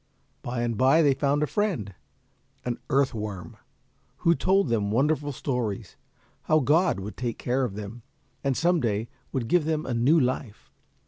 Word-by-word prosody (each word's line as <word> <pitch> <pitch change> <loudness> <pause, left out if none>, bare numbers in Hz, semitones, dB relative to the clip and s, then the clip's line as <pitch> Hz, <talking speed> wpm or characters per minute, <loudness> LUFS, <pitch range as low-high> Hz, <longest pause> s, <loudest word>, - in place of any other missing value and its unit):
By 120 -1 -3
and 115 -1 -2
by 135 +6 +5
they 140 -2 +5
found 145 +2 +1
a - - +3
friend, 165 - -1 0.7
an 120 -1 -2
earth 135 0 +2
worm, 100 -6 -6 0.7
who 170 - +6
told 195 +2 +2
them 110 -4 0
wonderful 145 +5 +1
stories, 125 -7 -3 0.5
how 155 - +4
God 155 - +3
would 100 +3 -7
take 120 -2 -3
care 130 +2 0
of 110 -6 -3
them, 105 +3 -7 0.4
and 135 -2 0
some 175 +1 +3
day 110 -3 -1 0.2
would 125 -4 -2
give 170 +4 +3
them 155 -1 -1
a 130 - -2
new 130 +8 +4
life. 125 -5 -3
130 Hz, 170 wpm, -26 LUFS, 115-150 Hz, 0.7 s, who